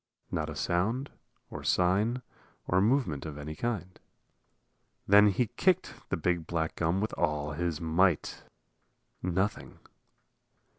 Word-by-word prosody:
Not 80 Hz, -1 st, -1 dB
a 75 Hz, -, -6 dB
sound 110 Hz, -, 0 dB, 0.4 s
or -, -, -7 dB
sign 105 Hz, +8 st, +2 dB, 0.4 s
or 90 Hz, +1 st, +2 dB
movement 105 Hz, -, +1 dB
of 75 Hz, -2 st, -6 dB
any 75 Hz, +1 st, -6 dB
kind. 95 Hz, -4 st, -3 dB, 1.1 s
Then 105 Hz, +1 st, +7 dB
he 105 Hz, +5 st, +2 dB
kicked 180 Hz, -, +1 dB, 0.2 s
the -, -, 0 dB
big 85 Hz, 0 st, 0 dB
black 80 Hz, -2 st, -2 dB
gum 85 Hz, +3 st, +1 dB
with 110 Hz, -, -2 dB
all 75 Hz, -3 st, 0 dB
his 85 Hz, 0 st, -2 dB
might. 85 Hz, +1 st, +1 dB, 0.8 s
Nothing. 95 Hz, +4 st, -2 dB
90 Hz, 120 wpm, -30 LUFS, 80-105 Hz, 1.1 s, Then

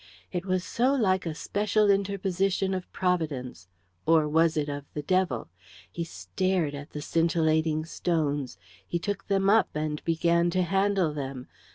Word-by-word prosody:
It 180 Hz, +2 st, -3 dB
was 185 Hz, -1 st, +1 dB
so 255 Hz, +8 st, +1 dB
like 190 Hz, -7 st, +1 dB
a 160 Hz, -, -3 dB
special 210 Hz, +3 st, +2 dB
interposition 195 Hz, -1 st, 0 dB
of 185 Hz, -1 st, -5 dB
Providence 155 Hz, -, -2 dB, 0.4 s
or 160 Hz, -2 st, +5 dB
was 160 Hz, +1 st, +3 dB
it 150 Hz, -1 st, 0 dB
of 145 Hz, -1 st, -5 dB
the 150 Hz, -, -3 dB
devil? 180 Hz, -, 0 dB, 0.4 s
He 170 Hz, -, -3 dB
stared 180 Hz, -2 st, -1 dB
at 145 Hz, +1 st, -7 dB
the 150 Hz, -, -6 dB
scintillating 160 Hz, -1 st, +1 dB
stones. 145 Hz, -6 st, -1 dB, 0.3 s
He 175 Hz, -, -1 dB
took 200 Hz, +3 st, -4 dB
them 195 Hz, -1 st, +2 dB
up 220 Hz, +3 st, +5 dB
and 150 Hz, 0 st, -2 dB
began 170 Hz, +1 st, +2 dB
to 185 Hz, -, +3 dB
handle 195 Hz, -2 st, +1 dB
them. 135 Hz, -3 st, -6 dB
170 Hz, 155 wpm, -27 LUFS, 150-190 Hz, 0.4 s, or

